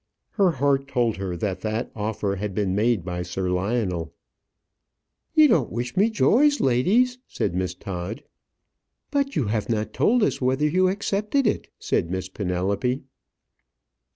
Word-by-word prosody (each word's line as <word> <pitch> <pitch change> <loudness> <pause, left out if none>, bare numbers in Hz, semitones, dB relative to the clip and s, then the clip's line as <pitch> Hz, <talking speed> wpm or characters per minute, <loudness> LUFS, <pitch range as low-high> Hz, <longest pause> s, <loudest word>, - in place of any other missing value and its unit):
Her 200 -4 +3
heart 140 -2 +1
told 120 -5 0
her 95 -2 -4
that 95 -1 -3
that 110 +3 -2
offer 105 -2 -2
had 100 0 -4
been 100 -3 0
made 105 -2 +1
by 90 -1 -3
Sir 90 +1 -3
Lionel. 90 -3 -1 1.2
"You 310 -1 +8
don't 160 - +2
wish 120 +5 -4
me 205 +4 +4
joy, 245 +6 +4
ladies," 215 - +2
said - - -2
Miss 90 0 -2
Todd. 95 +8 -6 0.9
"But 280 -1 0
you 135 - +1
have 110 +2 -2
not 110 -2 -1
told 245 0 +3
us - - 0
whether 130 +4 +2
you 185 +4 +3
accepted 210 +6 0
it," 215 - 0
said 85 - -1
Miss 95 0 -3
Penelope. 100 +7 -1
115 Hz, 150 wpm, -24 LUFS, -, 1.2 s, You